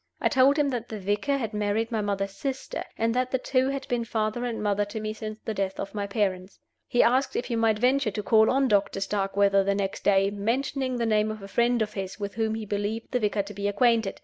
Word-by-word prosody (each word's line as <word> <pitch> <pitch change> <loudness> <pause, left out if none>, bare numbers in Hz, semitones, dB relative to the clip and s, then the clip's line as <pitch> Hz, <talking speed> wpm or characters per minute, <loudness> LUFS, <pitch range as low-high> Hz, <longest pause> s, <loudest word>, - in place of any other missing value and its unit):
I - - +2
told 275 +1 +4
him 295 -2 +2
that 240 -3 -4
the 220 - -5
vicar 205 +9 0
had 225 -5 -4
married 210 +2 -1
my 220 -2 0
mother's 195 -1 -2
sister, 270 +3 -4
and 225 0 +1
that 255 +1 0
the 260 - +1
two 260 +1 +1
had 275 -1 -4
been 240 -1 0
father 225 +1 -2
and 235 -2 -3
mother 205 0 +1
to 205 +2 -6
me 215 0 -3
since 215 0 -6
the 220 - -2
death 195 -2 -2
of - - -5
my 205 -1 -3
parents. 195 -2 -2 0.3
He 245 - +3
asked 260 +3 +2
if 245 - -1
he 235 - -2
might 225 -2 +2
venture 255 +1 +2
to 210 0 -4
call 220 +1 +5
on 270 0 +3
Doctor 200 -3 +1
Starkweather 195 0 +2
the 200 0 +1
next 195 -1 -3
day, 195 0 +3
mentioning 255 +5 -1
the 235 - 0
name 215 -1 +2
of 215 -2 -6
a - - -7
friend 235 +2 +2
of 215 - -6
his, 190 +1 -5
with 200 -1 -4
whom 220 -1 -1
he 220 -1 -5
believed 205 +2 -3
the 250 - +1
vicar 210 -2 0
to 205 +1 -9
be 200 0 -2
acquainted. 225 0 +2
215 Hz, 250 wpm, -26 LUFS, 200-240 Hz, 0.3 s, call